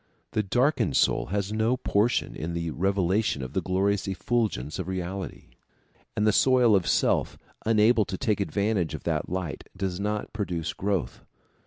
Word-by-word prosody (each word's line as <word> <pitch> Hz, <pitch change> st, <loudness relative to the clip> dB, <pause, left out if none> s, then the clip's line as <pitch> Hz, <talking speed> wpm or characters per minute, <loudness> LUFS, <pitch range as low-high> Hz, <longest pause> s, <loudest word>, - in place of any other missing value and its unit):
The 110 Hz, -, +1 dB
darkened 125 Hz, -, +1 dB
soul -, -, +2 dB
has 100 Hz, +1 st, -2 dB
no 110 Hz, +3 st, +1 dB
portion 115 Hz, -1 st, +1 dB
of 85 Hz, +1 st, -3 dB
the 85 Hz, -1 st, -2 dB
revelation 95 Hz, -3 st, +1 dB
of 65 Hz, -, -7 dB
the -, -, 0 dB
glorious 95 Hz, +2 st, 0 dB
effulgence 95 Hz, -, -1 dB
of 90 Hz, -, -3 dB
reality, 95 Hz, +1 st, -5 dB, 0.7 s
and 105 Hz, -, +2 dB
the 110 Hz, -, +5 dB
soil 125 Hz, -1 st, +4 dB
of 95 Hz, -3 st, +1 dB
self, -, -, +1 dB, 0.3 s
unable 110 Hz, 0 st, +4 dB
to 95 Hz, -, -4 dB
take 105 Hz, +1 st, 0 dB
advantage 100 Hz, -3 st, 0 dB
of -, -, -8 dB
that -, -, -1 dB
light, 90 Hz, -6 st, -4 dB
does 95 Hz, -2 st, -2 dB
not 105 Hz, +1 st, -2 dB
produce 90 Hz, -6 st, -3 dB
growth. 95 Hz, -10 st, -2 dB
100 Hz, 160 wpm, -27 LUFS, 90-110 Hz, 0.7 s, the